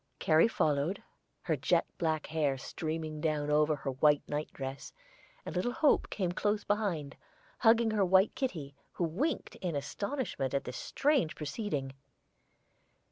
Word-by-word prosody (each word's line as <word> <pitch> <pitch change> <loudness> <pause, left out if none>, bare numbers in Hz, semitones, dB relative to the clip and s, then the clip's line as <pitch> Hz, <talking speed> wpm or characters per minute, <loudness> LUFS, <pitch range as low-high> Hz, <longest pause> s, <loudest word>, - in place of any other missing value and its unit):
Carrie 160 +5 +4
followed, 155 -2 0 0.4
her 160 - +1
jet 165 +5 +2
black 160 -2 0
hair 150 -4 0
streaming 155 +2 -4
down 150 -2 0
over 150 +1 +3
her 135 -1 -4
white 145 +2 +3
night 150 +1 -3
dress, 135 0 -6 0.5
and - - -6
little 215 +7 0
Hope 300 +1 +3
came 185 -4 -1
close 205 +3 0
behind, 180 -10 -1 0.4
hugging 225 -1 +5
her 210 -2 +2
white 190 +2 +4
kitty, 160 - -3 0.2
who - - -2
winked 235 - -1
in 175 -4 -3
astonishment 145 - -3
at 140 - 0
this 125 -1 -6
strange 275 - +1
proceeding. 150 - -3
160 Hz, 140 wpm, -32 LUFS, 145-205 Hz, 0.5 s, hugging